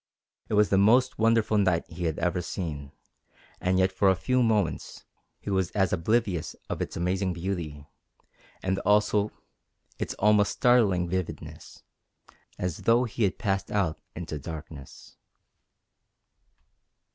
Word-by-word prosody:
It 110 - 0
was 105 0 +4
the 95 - +3
most 120 +6 +4
wonderful 115 -1 +3
night 95 -4 +2
he 85 +1 -5
had 80 -1 -1
ever 90 +1 0
seen, 75 -6 -5 0.7
and 95 0 +1
yet 95 0 +3
for 95 +1 +3
a 95 - +4
few 125 +7 +1
moments 110 -6 -1 0.3
he 100 - -5
was 95 -2 +1
as 95 -4 +1
oblivious 95 -1 0 0.2
of - - -3
its - - -4
amazing 95 +2 0
beauty, 85 -5 -4 0.8
its 105 +2 +2 1.1
almost 105 0 +4
startling 110 -9 +3
vividness, 95 0 -6 0.7
as 90 -3 -3
though 115 +2 +3
he 115 -2 0
had 95 - -1
passed 95 -3 -1
out 95 -7 -1
into 80 -3 -5
darkness. 75 -1 -10
95 Hz, 125 wpm, -27 LUFS, 85-105 Hz, 1.1 s, was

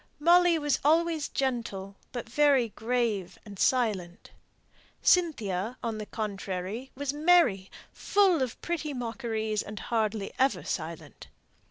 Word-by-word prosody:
Molly 345 +2 +5
was 295 -2 0
always 320 +1 +2
gentle, 230 -7 -3 0.2
but 245 -2 -5
very 270 -1 +3
grave 220 -6 -2
and 200 -3 -11
silent. 205 -9 0 0.7
Cynthia, 235 - +1
on 225 -2 -3
the 210 - -6
contrary, 200 +2 -4
was 285 0 -3
merry, 295 - +3 0.2
full 385 -7 +3
of 255 -3 -3
pretty 310 -4 -3
mockeries, 225 -3 -2
and 210 +1 -8
hardly 215 -3 -2
ever 255 - +2
silent. 165 -1 -6
235 Hz, 120 wpm, -28 LUFS, 200-290 Hz, 0.7 s, Molly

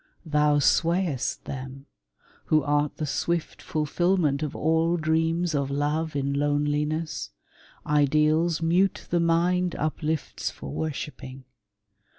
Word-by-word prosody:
Thou 150 -1 +3
swayest 165 0 +1
them, 135 +1 -7 0.6
Who 155 -1 +3
art 145 0 0
the 155 - -2
swift 170 +3 -2
fulfilment 155 -1 0
of 150 -2 -3
all 160 +2 +2
dreams 165 +1 +1
Of 140 -2 0
love 150 +3 -1
in 140 0 -1
loneliness 145 - -1 0.3
— - - -25 0.2
ideals 155 +3 +2
mute 180 +4 +2
The 175 - +3
mind 170 +1 +2
uplifts 155 0 -2
for 70 - -9
worshiping. 135 - -5
155 Hz, 115 wpm, -26 LUFS, 145-165 Hz, 0.6 s, Thou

